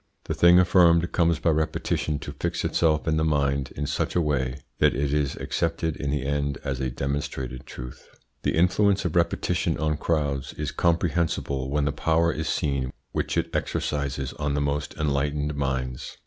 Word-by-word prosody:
The - - -3
thing 85 +1 +6
affirmed 85 -2 +5
comes 85 -2 +2
by 85 - +2
repetition 80 -1 -1
to - - -6
fix - - -1
itself 80 -1 +1
in 80 0 +2
the 80 - +2
mind 70 -3 +1
in 75 - -2
such - - -2
a - - +4
way 70 -4 0 0.2
that - - +4
it 70 0 0
is 75 -2 0
accepted 80 -1 -1
in 70 - -3
the 70 -1 -1
end 70 -1 -1
as 65 -2 -2
a 65 -1 -1
demonstrated 65 -1 -4
truth. 60 0 -9 0.3
The - - 0
influence 95 +4 +3
of 90 - -1
repetition 85 -1 +1
on 75 0 0
crowds 70 -5 -1
is 75 -1 -4
comprehensible 80 -5 0
when 75 +1 +1
the 75 - +1
power 80 +3 +2
is 80 +1 -3
seen 70 -5 -1 0.2
which - - -2
it - - -1
exercises 70 -2 -2
on 70 -1 0
the - - +1
most 70 +1 -2
enlightened 75 0 0
minds. 65 -3 -3
75 Hz, 175 wpm, -25 LUFS, 70-80 Hz, 0.3 s, thing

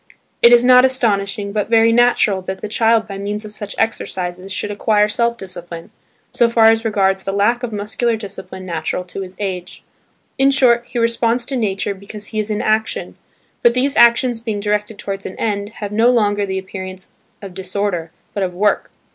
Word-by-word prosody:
It 235 - +7
is 240 0 +6
not 250 0 +7
astonishing 205 -6 0
but 210 0 -2
very 230 0 +5
natural 235 -5 +3
that 190 +1 -6
the - - -4
child 225 +1 +2
by 195 -2 -7
means 205 +2 -4
of 210 - -8
such 205 -1 -7
exercises 185 -4 -3
should 205 +2 -2
acquire 210 0 +2
self 235 +2 0
discipline, 175 -4 -8 0.4
so 235 - +3
far 230 -1 +3
as 225 0 0
regards 195 -3 +1
the 195 - -3
lack 210 +5 +1
of 245 -2 -4
muscular 215 +3 -1
discipline 190 -3 -8
natural 170 0 -3
to 180 +2 -7
his 185 -1 -8
age. 185 -3 -5 0.6
In 270 0 +5
short, 245 -3 +3
he 245 - -6
responds 235 +1 +1
to 270 - -3
nature 200 -4 -1
because 200 +2 -10
he 215 - -1
is 215 0 -2
in 210 -1 -2
action; 220 0 -1 0.5
but 240 0 +4
these 270 +2 +1
actions 235 0 +4
being 220 -3 -3
directed 210 +1 -1
towards 195 0 -5
an - - -9
end, 205 -2 -2
have 205 -3 -6
no 225 +3 +3
longer 205 -4 +1
the 190 0 -2
appearance 190 -1 -7 0.3
of 195 -3 -9
disorder 185 -2 -3 0.2
but 205 - -3
of 180 -2 -2
work. 205 +3 +1
210 Hz, 190 wpm, -18 LUFS, 195-230 Hz, 0.6 s, It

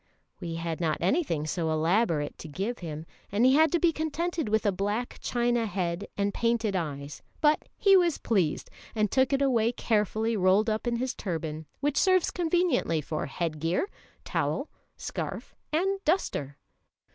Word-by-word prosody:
We 170 -3 -4
had 165 0 -3
not 155 -2 +1
anything 180 - +1
so 160 +1 -1
elaborate 160 -1 +1
to - - -8
give 195 +10 -3
him, 160 -2 -6 0.3
and 210 +5 +3
he 260 - +6
had 315 +3 +5
to 345 - +2
be 340 -1 +4
contented 320 -2 -2
with 220 +1 +1
a 205 - +4
black 205 +6 -2
china 240 -1 +1
head 180 -1 -2
and 200 0 0
painted 230 -3 0
eyes; 145 -4 -4 0.2
but 300 0 +2
he 395 -1 +6
was 350 -4 +4
pleased, 185 -9 0 0.2
and 215 -2 +1
took 260 0 +3
it 275 0 +2
away 235 -4 +3
carefully 220 0 0
rolled 200 +3 +3
up 215 +3 -2
in 240 - +1
his 255 +2 -1
turban, 160 -4 -4
which 285 0 0
serves 370 -2 +3
conveniently 340 - +1
for 155 +1 -3
head 155 +2 -3
gear, 165 - 0 0.4
towel, - - -1 0.3
scarf, - - -5 0.2
and 385 +5 0
duster. 145 - 0
215 Hz, 165 wpm, -28 LUFS, 165-275 Hz, 0.4 s, he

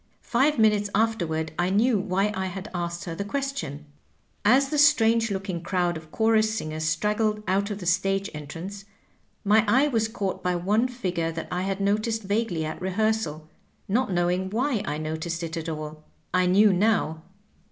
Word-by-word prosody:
Five 270 +5 +2
minutes 210 -2 +3
afterward 175 -8 0
I 175 +1 +2
knew 215 +3 +3
why 195 +1 0
I 190 -1 -2
had 190 +3 -7
asked 175 0 -3
her 170 - -4
the 165 - -3
question.. 270 - -4 0.6
"As 265 +6 +4
the 300 - 0
strange 230 -6 +4
looking 190 -3 -3
crowd 175 -1 0
of 155 -1 -10
chorus 220 -1 +2
singers 155 -3 -3
straggled 210 +6 0
out 195 +2 +1
of 205 - -3
the 190 - -8
stage 195 +3 +1
entrance, 165 +7 -7 0.6
my 215 +2 +4
eye 260 +7 +4
was 225 -4 +1
caught 200 -3 -3
by 180 0 0
one 205 +8 +1
figure 180 -10 -2
that 165 0 -5
I 180 0 -1
had 195 +1 -2
noticed 215 +2 0
vaguely 200 -5 -1
at 155 +2 -5
rehearsal, 190 -5 -1 0.4
not 235 +2 +1
knowing 180 +1 0
why 240 +1 0
I 150 - -2
noticed 160 +2 -4
it 165 0 -4
at 165 0 -4
all. 155 0 -6 0.3
I 185 0 +3
knew 200 +2 +5
now. 180 -5 +1
195 Hz, 175 wpm, -26 LUFS, 170-220 Hz, 0.6 s, knew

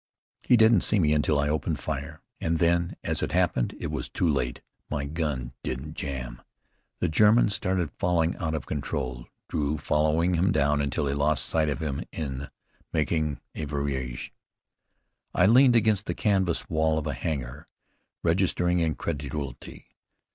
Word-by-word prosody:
"He 125 - +4
didn't 110 -3 +6
see 105 - +3
me 75 -5 +3
until 75 0 +2
I 70 - +1
opened 75 +1 -1
fire, - - -5 0.2
and 80 0 0
then, 85 +1 +2
as - - -1
it - - -2
happened, - - +1
it - - -4
was - - -3
too 90 - 0
late. 65 -5 -1 0.3
My 70 -2 -2
gun 70 -5 -3
didn't 65 +5 -5
jam!" 65 -5 -5 0.6
The - - +2
German 105 +7 +5
started 90 -4 0
falling 85 -1 +1
out 80 -2 -2
of 75 - -4
control, 65 -4 -4 0.2
Drew 75 0 -1
following 80 +4 +1
him 90 +2 +2
down 75 -1 +2
until 70 +1 -1
he 70 - 0
lost 70 -2 +1
sight 80 -2 +1
of 70 - -3
him 70 -3 -2
in 70 -3 -4 0.4
making 80 -2 0
a 80 - -4
virage. 70 -4 -3 1.0
I 90 - +5
leaned 125 +4 +6
against 110 -3 +2
the - - -2
canvas 95 -5 +1
wall 80 0 +1
of 80 - -2
a 75 - -1
hangar, 65 -1 -4 0.6
registering 90 0 +2
incredulity. 75 -3 -4
75 Hz, 155 wpm, -27 LUFS, 70-85 Hz, 1.0 s, didn't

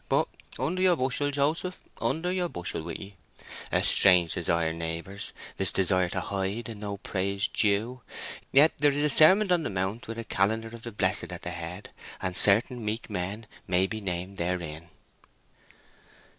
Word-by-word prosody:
But - - +2 0.3
under 185 +3 -1
your 185 -2 +5
bushel, 135 +1 0
Joseph! 155 +6 -1 0.2
under 160 +10 0
your 180 -1 -1
bushel 90 - -5
with 85 +1 -6
'ee! 100 0 -11 0.5
A - - +2
strange 90 -3 +7
desire, 85 -2 +1
neighbours, 85 +5 -5 0.3
this 95 - +3
desire 95 -1 +2
to - - -2
hide, 100 +4 -3
and 105 -2 -8
no 100 -1 -4
praise 100 +1 -1
due. 110 +5 0 0.5
Yet 145 +4 +6
there 145 0 +4
is 145 +1 0
a 150 - +2
Sermon 185 +7 +6
on 175 -2 +3
the 150 - -3
Mount 95 +4 -3
with 115 0 -6
a 115 - -4
calendar 110 +2 0
of 115 0 -11
the 120 - -6
blessed 105 - +1
at - - -8
the 90 - -4
head, 85 +3 -7 0.3
and 90 -1 -3
certain 115 +5 +3
meek 110 +1 -4
men 100 +3 -3 0.2
may 90 +1 +3
be 110 +3 -5
named 95 0 -4
therein." 85 -2 -3
100 Hz, 170 wpm, -27 LUFS, 90-125 Hz, 0.5 s, strange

